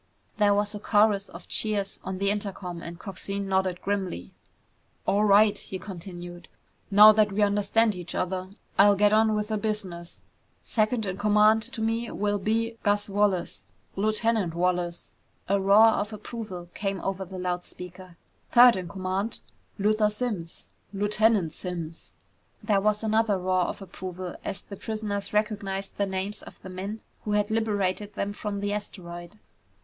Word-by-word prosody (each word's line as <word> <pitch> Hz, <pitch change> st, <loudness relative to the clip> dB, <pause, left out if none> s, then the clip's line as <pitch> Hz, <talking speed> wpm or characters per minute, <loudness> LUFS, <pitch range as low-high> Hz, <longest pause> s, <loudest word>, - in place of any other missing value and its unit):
There 205 Hz, -1 st, +4 dB
was 205 Hz, +1 st, 0 dB
a 210 Hz, -, -5 dB
chorus 205 Hz, -1 st, +2 dB
of -, -, -11 dB
cheers 210 Hz, -2 st, 0 dB
on 190 Hz, 0 st, -4 dB
the 200 Hz, +1 st, +1 dB
intercom 195 Hz, -4 st, -4 dB
and 170 Hz, 0 st, -7 dB
Coxine 195 Hz, +1 st, -5 dB
nodded 190 Hz, -2 st, 0 dB
grimly. 190 Hz, -, -3 dB, 0.7 s
"All 205 Hz, +2 st, +2 dB
right," 205 Hz, +1 st, +6 dB
he 190 Hz, -, -7 dB
continued, 175 Hz, -2 st, -9 dB, 0.4 s
"now 210 Hz, +1 st, +9 dB
that 215 Hz, -1 st, +3 dB
we 205 Hz, +2 st, +2 dB
understand 205 Hz, +2 st, +2 dB
each 180 Hz, -2 st, -7 dB
other, 185 Hz, 0 st, -2 dB, 0.3 s
I'll 200 Hz, 0 st, +7 dB
get 205 Hz, +1 st, +4 dB
on 220 Hz, 0 st, +4 dB
with 210 Hz, 0 st, -2 dB
the 215 Hz, -1 st, -1 dB
business. 195 Hz, -6 st, -4 dB, 0.4 s
Second 220 Hz, 0 st, +1 dB
in 190 Hz, -1 st, -3 dB
command 210 Hz, +1 st, +5 dB
to 245 Hz, -4 st, -5 dB
me 230 Hz, +1 st, -1 dB
will 205 Hz, 0 st, -1 dB
be 225 Hz, +3 st, -1 dB
Gus 205 Hz, 0 st, +1 dB
Wallace. 190 Hz, -, 0 dB, 0.3 s
Lieutenant 215 Hz, -3 st, +1 dB
Wallace!" 175 Hz, -1 st, -1 dB, 0.3 s
A 200 Hz, +1 st, +2 dB
roar 200 Hz, +3 st, +7 dB
of 210 Hz, -1 st, -1 dB
approval 215 Hz, -5 st, -7 dB
came 195 Hz, -1 st, -2 dB
over 195 Hz, 0 st, -2 dB
the 190 Hz, 0 st, -9 dB
loud 180 Hz, -1 st, -2 dB
speaker. 180 Hz, -1 st, -11 dB, 0.3 s
"Third 245 Hz, 0 st, +8 dB
in 185 Hz, -2 st, -4 dB
command 190 Hz, +3 st, -3 dB, 0.4 s
Luther 210 Hz, +1 st, +3 dB
Simms! 210 Hz, -7 st, -4 dB, 0.3 s
Lieutenant 205 Hz, -3 st, +2 dB
Simms!" 170 Hz, -2 st, -6 dB, 0.5 s
There 205 Hz, -2 st, +2 dB
was 210 Hz, +1 st, +1 dB
another 220 Hz, -2 st, +2 dB
roar 185 Hz, 0 st, +1 dB
of 195 Hz, -, -5 dB
approval 185 Hz, -1 st, -7 dB
as 195 Hz, -, -4 dB
the 200 Hz, -, -9 dB
prisoners 215 Hz, -2 st, -3 dB
recognized 205 Hz, -2 st, -2 dB
the 200 Hz, -, +1 dB
names 190 Hz, +2 st, -3 dB
of -, -, -13 dB
the 185 Hz, -, -8 dB
men 195 Hz, +4 st, -5 dB, 0.2 s
who 210 Hz, -, -2 dB
had 210 Hz, 0 st, +1 dB
liberated 205 Hz, -2 st, -1 dB
them 205 Hz, -1 st, -2 dB
from 205 Hz, -1 st, -4 dB
the 205 Hz, 0 st, -1 dB
asteroid. 175 Hz, -3 st, -7 dB
200 Hz, 155 wpm, -27 LUFS, 185-215 Hz, 0.7 s, now